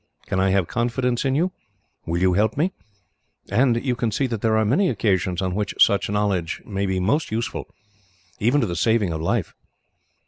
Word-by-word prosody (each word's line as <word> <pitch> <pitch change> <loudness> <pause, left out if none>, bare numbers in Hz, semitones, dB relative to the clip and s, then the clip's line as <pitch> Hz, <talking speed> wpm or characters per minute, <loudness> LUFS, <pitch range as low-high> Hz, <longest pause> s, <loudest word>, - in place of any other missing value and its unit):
Can 95 - -1
I 95 0 +3
have 95 -1 +2
confidence 120 +1 -1
in 135 0 +1
you? 175 +5 +1 0.6
Will 85 +1 0
you 90 0 +3
help 110 +5 +1
me?' 175 +6 +1 0.8
and 120 +3 +2
you 125 -2 +1
can 120 -1 -1
see 140 +6 0
that 115 -5 -3
there 110 -1 +2
are 110 - +2
many 160 - +2
occasions 95 -3 0
on 95 -1 -1
which 105 0 -2
such 100 -1 +4
knowledge 100 -5 -1
may 100 -1 -2
be 95 -1 0
most 140 - +1
useful, 115 +2 -3 0.7
even 125 +7 +2
to - - +2
the 85 - -3
saving 105 0 +1
of 80 - -4
life." 85 - -1
110 Hz, 195 wpm, -23 LUFS, 95-125 Hz, 0.8 s, such